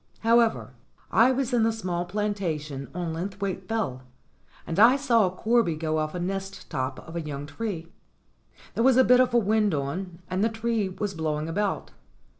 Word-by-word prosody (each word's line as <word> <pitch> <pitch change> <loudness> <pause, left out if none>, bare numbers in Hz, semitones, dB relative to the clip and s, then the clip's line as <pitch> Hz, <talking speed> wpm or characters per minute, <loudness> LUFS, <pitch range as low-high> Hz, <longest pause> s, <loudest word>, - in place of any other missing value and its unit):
However, 230 - +3 0.4
I 235 +3 +5
was 260 -1 -1
in 240 - +3
the 225 +1 +3
small 180 -5 -3
planta 200 -4 -1
tion 140 -2 -7
on 175 -2 -3
Linthwaite 190 +2 -4
Fell, 190 - -2 0.6
and 165 - -2
I 235 +5 +8
saw 235 -7 +3
a - - 0
corby 215 -1 +1
go 155 0 -1
off 155 +2 -2
a - - -2
nest 195 +2 -4
top 130 0 -2
of 165 - -9
a 170 - -1
young 145 -2 -5
tree. 175 -1 -5 0.9
There 230 - 0
was 260 -1 +5
a 260 - +7
bit 250 0 +6
of 255 0 +4
a - - +7
wind 210 -4 +2
on, 170 +6 -4
and 185 +2 -1
the 225 - +3
tree 225 -2 -1
was 195 +1 -4
blowing 155 -2 -2
about. 200 +4 -2
195 Hz, 190 wpm, -26 LUFS, 165-225 Hz, 0.9 s, I